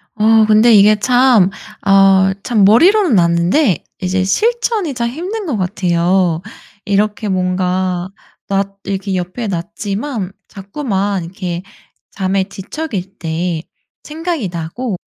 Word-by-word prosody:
어 220 0 +4
근데 220 +2 +5
이게 210 +1 +6
참 245 -4 +4 0.4
어 195 -1 +5
참 215 -5 +2
머리로는 330 - +5
아는데 170 - +2 0.2
이제 185 0 0
실천이 435 - 0
참 235 -1 -2
힘든 375 - -5
거 285 -10 -2
같아요. 180 -2 0 0.4
이렇게 210 +1 0
뭔가 185 -1 -1 0.4
놨 195 0 +1 0.2
이렇게 195 0 -3
옆에 185 +6 -4
놨지만 200 +4 -4 0.2
자꾸만 200 - -3
이렇게 175 -1 -5 0.5
잠에 190 0 -1
뒤척일 200 - -6
때 165 0 -2 0.4
생각이 315 - -4
나고 180 +7 -4
195 Hz, 230 characters per minute, -16 LUFS, 185-240 Hz, 0.5 s, 이게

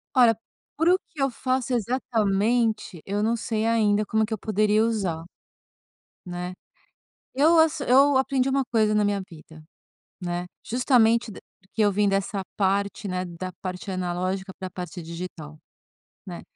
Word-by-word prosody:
Olha, 240 -4 +6 0.4
para 330 +4 +4
o - - +4
que 305 - -7
eu 275 - +3
faço 255 +1 -1
exatamente, 220 -4 0
eu 200 +1 -1
não 230 +2 +2
sei 220 -1 -2
ainda 215 -2 +2
como 220 +2 +1
é - - +2
que 220 - -5
eu 220 - -2
poderia 215 +1 +2
usar, 195 -8 -1 1.0
né. 180 0 -5 0.8
Eu 315 +5 +5
assi 320 -3 +2
eu 275 +2 +6
aprendi 265 0 +1
uma 270 0 +1
coisa 215 -3 +2
na 210 0 +3
minha 205 -1 0
vida, 160 -2 -14 0.6
né. 175 0 -3 0.2
Justamente 235 -2 +3 0.3
porque 195 +3 -4
eu 205 - +4
vim 205 +1 +2
dessa 195 0 -1
parte, 200 +1 0
né, 185 -1 -2
da 180 +1 -6
parte 185 +1 -5
analógica 185 +1 -2
para 190 - -5
a - - -12
parte 180 0 -6
digital, 165 -2 -8 0.7
né. - - -7
210 Hz, 155 wpm, -25 LUFS, 185-240 Hz, 1.0 s, Olha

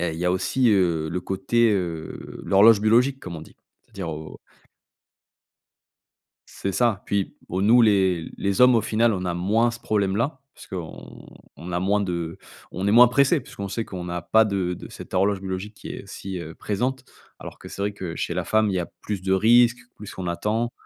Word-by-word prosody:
heu, 85 -1 0
il 80 - -7
y 90 - -3
a 90 - +3
aussi, 115 +7 +1
heu, 85 -6 +2
le 90 +2 -2
côté, 105 +6 +1
heu 85 -5 -4
l'horloge 105 +2 +6
biologique 125 +5 +3
comme 85 -2 -7
on 80 - -8
dit. - - -16 0.3
C'est-à-dire 95 -4 -7
au 80 0 -8 2.1
C'est 100 - -4
ça. 110 -2 +1
Puis 100 -1 -1
o 95 +2 -2
nous 120 +4 +6
les 95 -6 +2
les 100 +1 -1
hommes, 125 0 +7
au 115 - +4
final, 110 +2 +1
on 95 -2 -3
a 90 -1 -2
moins 105 +7 +2
ce 120 - -8
problème-là 110 +7 0 0.2
parce - - -14
qu'on 90 -4 -9 0.3
on 90 +2 -8
a 85 - 0
moins 100 +3 +1
de 85 -4 -3 0.3
on 95 +3 -3
est - - +3
moins 120 +3 +8
pressés, 140 +5 +3
puisqu'on 100 -5 -8
sait 115 +3 -3
qu'on 90 -4 -7
n'a 85 0 -4
pas 110 +5 +4
de 95 -4 -1
de - - -10
cette - - -10
horloge 100 +1 +2
biologique 95 +2 -5
qui - - -10
est 100 - -8
si, 95 -1 -6
heu, 80 -2 -8
présente. 125 +5 -3 0.3
Alors - - -10
que, - - -11
c'est - - -9
vrai 100 +1 -1
que 90 -4 -6
chez 85 - -3
la 90 0 -2
femme, 110 +4 +2
il 100 - -1
y - - +1
a 85 - -4
plus 100 -3 -4
de 95 0 0
risques, 120 +4 +5 0.2
plus 105 -1 -10
on 95 - -4
attend. 105 +7 -1
100 Hz, 210 wpm, -24 LUFS, 90-110 Hz, 2.1 s, moins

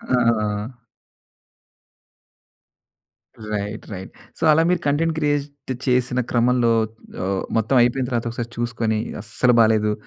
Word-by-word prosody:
ఆ! 115 -2 0 2.8
Right, 105 +1 -4
right. 95 0 -7 0.3
So, - - -15
అలా 160 +2 +4
మీరు 180 -1 +2
కంటెంట్ 160 +3 +1
క్రియేట్ 145 -2 -2
చేసిన 125 0 +1
క్రమంలో 120 0 +3 0.5
ఆహ్, 95 0 -1
మొత్తం 110 +4 +2
అయిపోయిన 125 +2 +1
తర్వాత 120 -1 -1
ఒకసారి 120 0 -5
చూసుకొని 115 -2 -1 0.2
అస్సలు 125 +3 +1
బాలేదు. 110 -1 +3
120 Hz, 105 wpm, -22 LUFS, 110-130 Hz, 2.8 s, అలా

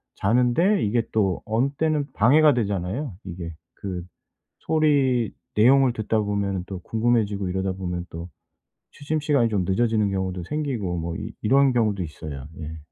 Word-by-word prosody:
자는데 125 - +2
이게 115 +3 +1
또 95 -5 0
어느 115 +5 +1
때는 150 -3 0
방해가 145 +6 +5
되잖아요 100 - -2
이게. 85 -2 -6 0.2
그 90 -3 -5 0.6
소리 140 -8 +2 0.2
내용을 130 +3 +5
듣다 110 -1 0
보면은 100 -3 -1
또 95 -2 -6
궁금해지고 110 -3 0
이러다 95 +1 -1
보면 90 -2 -4
또 85 +2 -7 0.6
취침 150 +2 -3
시간이 145 -6 +2
좀 100 -4 0
늦어지는 110 +2 +1
경우도 95 -2 -2
생기고 120 - -2
뭐 85 0 -4
이 - - -6
이런 135 +4 +4
경우도 105 -5 +1
있어요. 75 -4 -7
예. 80 0 -6
105 Hz, 320 characters per minute, -24 LUFS, 95-130 Hz, 0.6 s, 방해가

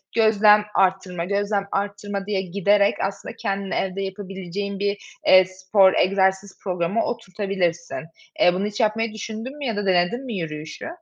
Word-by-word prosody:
gözlem 210 -2 +5
arttırma, 185 -2 +1
gözlem 200 +1 0
arttırma 200 0 -3
diye 200 -2 -1
giderek 200 +2 +2
aslında 195 +1 -4
kendini 195 -1 -3
evde 190 +1 -2
yapabileceğin 195 0 -5
bir, 200 0 0 0.3
eee, 185 0 +8
spor, 190 +1 +3
egzersiz 190 +1 +1
programı 180 +3 0
oturtabilirsin. 190 -6 -2 0.4
Eee, 175 - +5
bunu 190 +3 -1
hiç 210 0 -4
yapmayı 220 +1 +1
düşündün 225 +5 -6
mü 290 - -5
ya 230 -4 -1
da 205 0 -2
denedin 185 +7 +1
mi 245 - -5
yürüyüşü? 155 -2 -6
195 Hz, 145 wpm, -23 LUFS, 185-210 Hz, 0.4 s, eee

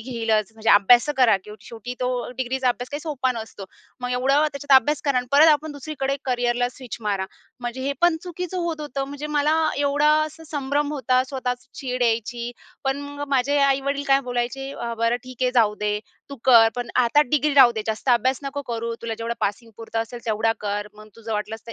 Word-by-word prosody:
घेईलच 225 -3 -1
म्हणजे 225 0 0
अभ्यास 240 +6 +6
तर - - +1
करा, 240 -6 +5
की - - -11 0.2
शेवटी 235 +2 -7
तो 250 0 0 0.3
डिग्रीचा 260 0 0
अभ्यास 245 +1 -2
काही 290 - -4
सोपा 285 -5 -1
नसतो. 220 -4 -8 0.4
मग 250 0 -3
एवढं 275 +4 +3
त्याच्यात 280 -1 +2
अभ्यास 295 +4 +2
करा 275 -3 +2
आणि 250 - -3
परत 305 +3 +7
आपण 300 +1 -2
दुसरीकडे 280 -1 -3
करियरला 245 -1 0
स्विच 250 -2 -9
मारा. 200 -3 -1 0.3
म्हणजे 240 +2 -5
हे 280 +1 -1
पण 345 -1 +4
चुकीचं 360 0 -5
होत 325 -2 -3
होतं 275 -2 -3
म्हणजे 285 +2 -6
मला 300 +2 +3 0.2
एवढा 290 +1 +2 0.2
असा 315 +1 -12
संभ्रम 290 0 -1
होता 255 -2 +2
स्वतःच 250 -2 -4
चीड 250 -3 -3
यायची 235 +1 -1 0.3
पण 270 +1 0
मग 285 0 -6
माझे 280 +1 +2
आई-वडील 275 +1 +1
काय 275 0 +5
बोलायचे 245 +3 -2
अ, 235 -3 -5
"बरं 230 +1 +2
ठीक 255 0 -8
आहे, 250 - +3
जाऊ 215 -3 +4
दे 210 0 0 0.3
तू 280 - -7
कर, 230 -3 +7
पण 245 -1 -3 0.2
आता 290 +6 +4
डिग्री 300 0 +2
राहू 255 -4 +8
दे 220 -1 -3
जास्त 220 +4 -3
अभ्यास 255 +2 +2
नको 280 +1 -4
करू 230 -2 -4
तुला 225 -1 -3
जेवढं 230 +1 -3
पासिंग 215 +3 -2
पुरतं 225 0 -5
असेल 240 +1 -9
तेवढा 220 +1 +1
कर. 205 0 -2
मग 215 0 -14
तुझं 225 0 -6
वाटलंस 220 +2 -4
तर 230 - -7
250 Hz, 205 wpm, -23 LUFS, 230-280 Hz, 0.4 s, राहू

